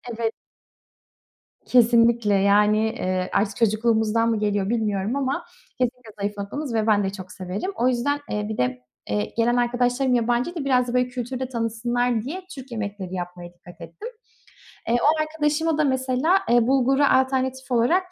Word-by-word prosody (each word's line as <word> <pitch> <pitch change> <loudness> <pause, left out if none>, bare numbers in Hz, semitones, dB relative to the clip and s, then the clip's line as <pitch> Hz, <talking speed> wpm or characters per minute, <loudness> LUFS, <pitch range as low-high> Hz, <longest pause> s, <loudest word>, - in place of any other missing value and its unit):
Evet. 225 0 -1 1.3
Kesinlikle! 235 -3 +4
Yani, 205 +2 +4 0.2
eee, 185 0 -2
artık 200 0 +1
çocukluğumuzdan 225 0 +2
mı 225 -2 0
geliyor 205 -1 0
bilmiyorum 215 -1 -1
ama 275 -1 -2 0.3
kesinlikle 250 -2 -2
zayıf 205 +1 -3
noktamız 235 +7 -5
ve 220 -1 0
ben 205 -2 +3
de 195 - 0
çok 190 -2 -9
severim. 190 - -4
O 245 - +1
yüzden, 255 +4 0
eee, 210 0 -2
bir 220 - -4
de, 125 0 -1 0.3
eee, 105 0 -2
gelen 235 +1 +2
arkadaşlarım 245 +2 +1
yabancıydı. 245 +7 0
Biraz 250 -2 +2
da 240 - -4
böyle 250 0 +2
kültürü 250 0 -5
de 260 -1 -3
tanısınlar 240 0 -1
diye 335 +9 -5
Türk 265 -1 -10
yemekleri 200 -4 -5
yapmaya 175 -1 -7
dikkat 175 0 -16
ettim. 440 - -9 0.8
Eee, 235 - +2
o 310 +1 +3
arkadaşıma 310 0 0
da 305 - +2
mesela, 260 +5 +2
eee, 240 -1 +4
bulgura 270 +2 +3
alternatif 260 0 0
olarak 340 +11 +2
235 Hz, 160 wpm, -23 LUFS, 210-260 Hz, 1.3 s, Kesinlikle